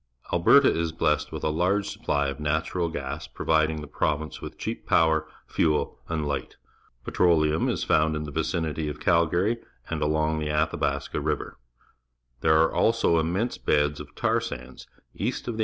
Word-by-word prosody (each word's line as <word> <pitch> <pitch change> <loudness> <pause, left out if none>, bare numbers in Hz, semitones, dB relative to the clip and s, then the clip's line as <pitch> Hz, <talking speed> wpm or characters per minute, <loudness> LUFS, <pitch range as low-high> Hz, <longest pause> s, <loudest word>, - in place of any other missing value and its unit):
Alberta 130 +11 +6
is 85 -1 -1
blessed 75 -1 0
with - - -6
a 75 - +1
large 90 +6 +1
supply 70 -1 -1
of 70 +2 -4
natural 80 +3 -1
gas, 75 -1 -5
providing 80 -1 0
the 75 - -8
province 75 +2 -2
with - - -8
cheap - - -5
power, 80 -1 +3 0.2
fuel, 75 -3 0
and 80 -2 -1
hght. 70 -1 -3 0.5
Petrol 85 -3 +3
eum 75 +1 +1
is - - -1
foimd 80 0 +2
in 75 - -3
the 75 - -6
\"icimt3' 80 0 -2
of 75 - -7
Calgarj' 85 +7 +2 0.3
and 80 -2 -2
along 80 +1 +1
the 75 -1 -2
Athabaska 75 +1 -1
River. - - -3 0.8
There 80 - +4
are 80 - 0
also 115 -8 +3
inmiense 95 +9 -2
beds 75 0 +2
of - - -10
tar - - +1
sa - - -4
nds 65 +1 -12 0.3
east - - -3
of 115 -2 -3
the - - -7
80 Hz, 175 wpm, -26 LUFS, 75-85 Hz, 0.8 s, Alberta